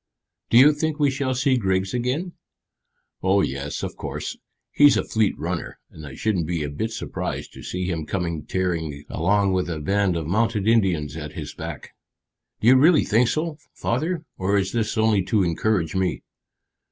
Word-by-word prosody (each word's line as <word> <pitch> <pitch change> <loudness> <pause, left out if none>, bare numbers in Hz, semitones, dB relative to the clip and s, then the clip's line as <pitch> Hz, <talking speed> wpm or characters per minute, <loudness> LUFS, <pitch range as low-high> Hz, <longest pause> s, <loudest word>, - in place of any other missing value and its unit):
"Do 115 - +5
you 145 +5 +8
think 155 +1 -2
we 145 -2 +3
shall 130 -1 -1
see 135 0 +2
Griggs 95 -3 0
again?" 130 +9 -2 0.9
"Oh 95 +1 +3
yes, 70 -2 -3
of - - -4
course. - - -5 0.4
He's 145 -2 +6
a - - +1
fleet 110 -3 0
runner, 85 +1 -4
and 75 -1 -10
I 65 - -9
shouldn't 95 -8 -1
be 85 -3 -1
a 75 - -4
bit 110 +10 -2
surprised 115 - -5
to - - -11
see 90 0 -4
him 80 -4 -3
come 85 -3 -2
tearing 80 -6 -2
along 100 +3 +2
with 90 -1 0
a 80 -2 -3
band 95 +3 +1
of 80 - -3
mounted 105 +3 0
Indians 90 - +2
at 75 -2 -6
his - - -6
back." - - -8 0.7
"Do 110 - +1
you 130 +2 +8
really 155 +4 +5
think 115 +3 +3
so, 155 +3 -2 0.2
father, 160 +7 -2
or 100 +2 +1
is 95 -2 0
this 110 -2 -1
only 110 -2 +3
to 105 -1 +2
encourage 85 0 0
me?" 95 -1 -1
100 Hz, 180 wpm, -23 LUFS, 85-125 Hz, 0.9 s, you